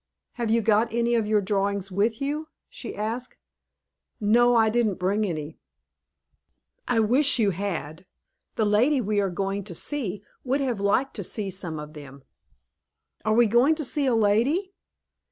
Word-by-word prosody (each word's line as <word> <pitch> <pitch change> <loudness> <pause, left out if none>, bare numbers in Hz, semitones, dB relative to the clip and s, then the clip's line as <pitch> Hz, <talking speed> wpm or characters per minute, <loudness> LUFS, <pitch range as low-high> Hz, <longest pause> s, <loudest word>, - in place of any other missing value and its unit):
"Have 235 -2 -3
you 230 0 +2
got 220 +2 +2
any 235 +1 0
of 225 -3 +1
your 210 -1 +2
drawings 200 -1 -1
with 215 +4 0
you?" 295 +3 -3 0.2
she - - -8
asked. 225 +4 -4 0.8
"No, 240 +3 +4
I 225 -1 +4
didn't 225 -4 +1
bring 200 +4 0
any." 155 -3 -5 1.3
"I 240 -2 +2
wish 255 +7 +4
you 210 -4 +2
had; 180 -3 -5 0.5
the 220 - +1
lady 240 +8 +3
we 210 -3 0
are 195 - 0
going 195 +2 -3
to 180 -5 -8
see 210 - -2 0.2
would 265 +2 0
have 250 -6 -1
liked 210 +7 +1
to 200 - -4
see 200 +2 -3
some 175 -4 -5
of 150 0 -9
them." 140 -3 -12 1.0
"Are 215 0 +1
we 240 +1 +5
going 240 +8 +3
to 305 -2 -4
see 280 +2 0
a 250 - +2
lady?" 240 - +1
215 Hz, 165 wpm, -25 LUFS, 195-240 Hz, 1.3 s, we